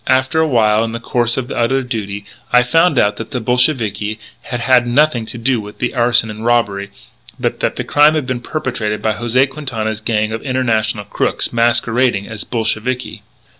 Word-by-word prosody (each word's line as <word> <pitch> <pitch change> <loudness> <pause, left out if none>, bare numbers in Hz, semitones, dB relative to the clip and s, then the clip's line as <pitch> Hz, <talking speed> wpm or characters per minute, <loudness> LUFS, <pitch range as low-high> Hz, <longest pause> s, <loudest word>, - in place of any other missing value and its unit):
After 130 +4 +2
a 160 - +3
while, 110 -5 +3
in 115 0 -3
the 115 - -4
course 120 0 0
of 125 -2 -3
other 130 +3 +1
duty, 105 -5 -5 0.3
I 125 0 +5
found 165 +4 +3
out 105 -2 +2
that 115 - -6
the 130 - -3
Bolsheviki 110 -4 0 0.2
had 120 - -5
had 125 0 +3
nothing 125 -2 +2
to 120 - -6
do 120 0 0
with 105 0 -11
the 125 - -2
arson 120 -2 +2
and 105 +1 -8
robbery, 105 -4 +1 0.5
but - - -2
that - - -1
the - - -3
crime 150 +2 +4
had 155 -4 -1
been 125 -2 -3
perpetrated 120 -7 -3
by 110 - +1
José 120 +4 +2
Quintana's 115 -6 -4
gang 110 -1 0
of 110 0 -4
international 115 -5 0
crooks 100 - -1
masquerading 120 -2 +1
as 110 -2 -6
Bolsheviki." 120 +2 -2
120 Hz, 185 wpm, -17 LUFS, 110-130 Hz, 0.5 s, I